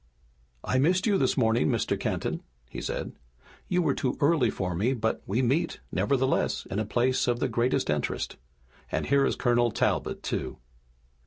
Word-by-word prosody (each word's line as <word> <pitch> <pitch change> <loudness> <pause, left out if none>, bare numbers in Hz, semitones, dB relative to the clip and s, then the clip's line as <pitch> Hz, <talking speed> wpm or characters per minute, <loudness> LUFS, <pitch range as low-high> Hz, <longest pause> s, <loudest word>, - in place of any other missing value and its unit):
"I 130 - +1
missed 180 +6 +3
you 205 -3 +3
this 130 0 +1
morning, 110 - +3
Mr. - - +1
Kenton," - - -2 0.3
he - - -7
said. - - -3 0.6
"You 180 0 +1
were 145 -4 +2
too 130 -1 -2
early 145 -5 +3
for 90 -3 -2
me, 110 +10 +1
but 110 -1 -1
we 115 +7 +1
meet, 155 +8 0
nevertheless, 135 -1 +1
in 100 - -1
a 110 - -1
place 125 +5 +1
of 120 -1 +1
the 135 - +1
greatest 125 +3 0
interest. 75 -1 -2 0.6
And - - -1
here 140 0 +3
is - - 0
Colonel 120 -1 +2
Talbot, - - -1
too!" - - -3
125 Hz, 170 wpm, -27 LUFS, 115-140 Hz, 0.6 s, missed